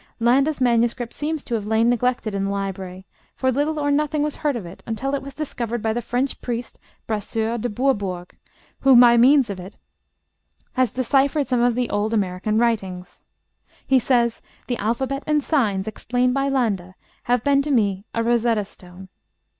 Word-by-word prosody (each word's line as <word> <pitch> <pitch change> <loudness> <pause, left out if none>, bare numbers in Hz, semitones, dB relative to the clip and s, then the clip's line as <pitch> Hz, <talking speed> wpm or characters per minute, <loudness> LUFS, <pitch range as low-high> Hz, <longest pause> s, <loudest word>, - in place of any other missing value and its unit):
Landa's 270 +6 +2
manuscript 240 -1 +1
seems 305 0 -3
to 240 - -6
have 210 -3 -2
lain 220 +1 +2
neglected 245 -2 0
in 195 0 -1
the - - -1
library, 190 -2 -5 0.3
for 260 0 +1
little 295 +4 0
or 290 -1 0
nothing 300 +1 +1
was 300 -1 -3
heard 295 -3 0
of 220 -6 -5
it 170 +2 -11
until 260 +5 -2
it 280 - -1
was 275 0 -10
discovered 240 -6 -4
by 220 0 +1
the 240 - -2
French 250 +4 -2
priest 240 -1 -5 0.3
Brasseur 220 +2 -2
de 245 - -2
Bourbourg, 205 -7 -2 0.4
who, 270 -1 +5
by 240 -1 +7
means 255 -1 +5
of 190 - -6
it, 185 +3 -10 1.0
has 255 -2 +1
deciphered 275 +3 +1
some 250 -2 0
of 240 -1 +3
the 250 -1 0
old 215 +2 0
American 200 +1 -1
writings. 190 -6 -2 0.6
He 265 -1 +4
says, 235 -2 +1 0.2
'the 245 - -2
alphabet 265 +6 -1
and 300 -1 +2
signs 215 -12 0
explained 245 +3 0
by 275 +1 0
Landa 200 -9 -1 0.3
have 245 -1 +1
been 280 -1 +3
to 290 - -4
me 200 -7 +1
a 230 - +1
Rosetta 230 -2 +1
stone.' 185 0 -12
235 Hz, 180 wpm, -22 LUFS, 210-270 Hz, 1.0 s, by